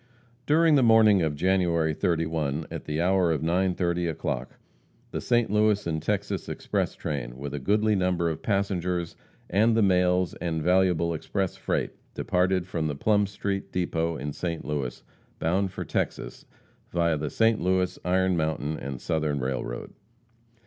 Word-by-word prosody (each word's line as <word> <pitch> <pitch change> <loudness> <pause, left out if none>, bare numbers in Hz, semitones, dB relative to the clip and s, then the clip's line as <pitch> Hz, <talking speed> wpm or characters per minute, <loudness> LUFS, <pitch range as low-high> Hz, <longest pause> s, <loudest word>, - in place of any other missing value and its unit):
During 160 +2 +5
the 140 - +5
morning 110 -4 +6
of 80 -3 0
January 85 -2 +2
31, 80 -2 -1
at - - -6
the 75 +1 -2
hour 90 0 +3
of 80 - -1
9:30 90 0 +1
o'clock, 80 - -4 0.5
the - - -3
St. 120 -3 +1
Louis 105 -1 +2
and 80 -2 -2
Texas - - -2
express - - -2
train, 65 -4 -4
with 70 +1 -6
a 75 - -3
goodly 105 +7 +2
number 90 -2 +1
of 80 -1 -3
passengers, 90 -4 -1 0.3
and 110 +4 +3
the 110 - +4
mails 90 -2 +2
and 80 -3 -2
valuable 90 -2 +3
express 95 +4 -2
freight, - - -2 0.2
departed 90 0 +1
from 85 -4 -2
the 75 - -3
Plum 105 +6 +2
street 100 0 -4
depot 85 -2 -1
in 75 +1 -4
St. 85 0 -4
Louis, 70 -4 -3 0.3
bound 95 +4 0
for - - -5
Texas, - - -3 0.4
via 85 -2 +1
the 75 0 -3
St. 115 -1 +2
Louis, 90 0 +1
Iron 95 0 +2
Mountain 80 -1 -1
and 70 -1 -5
Southern 75 -1 -1
railroad. 65 -2 -4
90 Hz, 155 wpm, -26 LUFS, 80-95 Hz, 0.5 s, morning